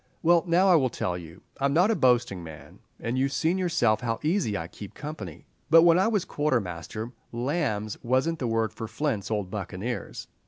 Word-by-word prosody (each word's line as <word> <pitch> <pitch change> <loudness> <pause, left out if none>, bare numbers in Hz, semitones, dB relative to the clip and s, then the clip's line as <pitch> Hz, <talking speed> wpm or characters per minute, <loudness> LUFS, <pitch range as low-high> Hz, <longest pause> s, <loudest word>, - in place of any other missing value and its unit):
Well, 170 0 +5
now, 175 +3 +4
I 185 - +6
will 130 -4 +2
tell 90 -6 -2
you. 85 0 -10 0.2
I'm 140 0 +1
not 185 +6 +4
a - - +2
boasting 120 - +2
man, 80 -2 -11 0.2
and 120 +3 -2
you 135 +1 +2
seen 165 +6 0
yourself 125 -12 +2
how 115 -2 -2
easy 155 - +1
I 80 - -5
keep 100 +3 -11
company; 110 - -7 0.2
but 165 +1 +8
when 170 0 +6
I 190 - +3
was 210 -5 +1
quartermaster, 115 - -2 0.2
lambs 120 -5 -2
wasn't 130 +7 +1
the 125 - -1
word 115 -1 0
for 110 0 -6
Flint's 110 -3 -2
old 105 -4 -2
buccaneers." 105 +3 -5
120 Hz, 190 wpm, -27 LUFS, 105-160 Hz, 0.2 s, but